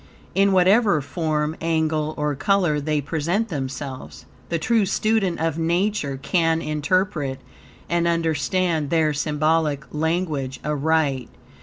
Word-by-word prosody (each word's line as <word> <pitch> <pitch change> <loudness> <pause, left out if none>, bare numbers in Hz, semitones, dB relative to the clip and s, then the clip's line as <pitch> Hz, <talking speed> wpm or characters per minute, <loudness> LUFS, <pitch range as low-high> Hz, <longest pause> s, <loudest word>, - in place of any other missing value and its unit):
In 195 0 +3
whatever 190 0 +4
form, 150 +2 -2
angle, 160 -1 0
or 150 -1 0
color 155 0 +1
they 150 0 0
present 170 +9 -1
themselves, 135 -3 -6 0.2
the 170 - 0
true 220 +7 +2
student 200 -2 +1
of 165 0 -1
Nature 170 -3 0
can 165 +3 +1
interpret 150 -2 -1 0.5
and 170 0 +1
understand 165 -1 0
their 155 -2 +2
symbolic 150 0 0
language 155 -4 -1
aright. 150 -4 0
160 Hz, 115 wpm, -23 LUFS, 150-175 Hz, 0.5 s, whatever